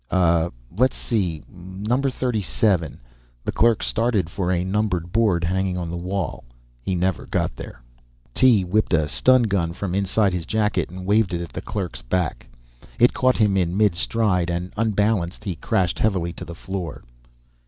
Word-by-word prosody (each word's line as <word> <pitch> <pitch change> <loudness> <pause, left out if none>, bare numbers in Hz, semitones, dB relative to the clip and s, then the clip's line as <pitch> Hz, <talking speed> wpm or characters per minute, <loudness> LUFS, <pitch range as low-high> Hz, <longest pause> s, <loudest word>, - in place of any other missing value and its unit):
"Uh, 85 -2 +3 0.3
let's 130 +5 +2
see, 90 -9 -2
number 100 +9 -2
thirty 125 -4 -1
seven." 90 -5 0 0.4
The - - -1
clerk 115 -1 +3
started 110 -7 0
for 90 -3 -2
a 90 -1 +1
numbered 95 -3 -1
board 105 -5 +2
hanging 95 +1 0
on 85 -2 -4
the - - -4
wall. 90 +2 -3 0.4
He 95 +9 -2
never 90 +1 -1
got - - -1
there. - - -10 0.5
Tee 115 - +5
whipped 100 +2 0
a 80 -2 +1
stun 130 - +4
gun 95 -6 0
from 90 0 -4
inside 100 +1 +2
his 85 -2 -3
jacket 105 -6 0
and 90 +1 -8
waved 100 -2 +2
it 85 - -3
at 85 - -7
the - - -4
clerk's 95 -5 -4
back. 80 +6 -2 0.5
It 120 +1 +5
caught 130 0 +2
him 105 -3 +3
in 90 -1 0
mid 105 -3 +4
stride, 90 -1 0
and 85 +1 -3
unbalanced, 105 -4 0
he 95 - -2
crashed 90 +2 0
heavily 90 -6 0
to 90 - -8
the 85 0 -8
floor. 95 -1 -6
95 Hz, 175 wpm, -23 LUFS, 85-110 Hz, 0.5 s, Tee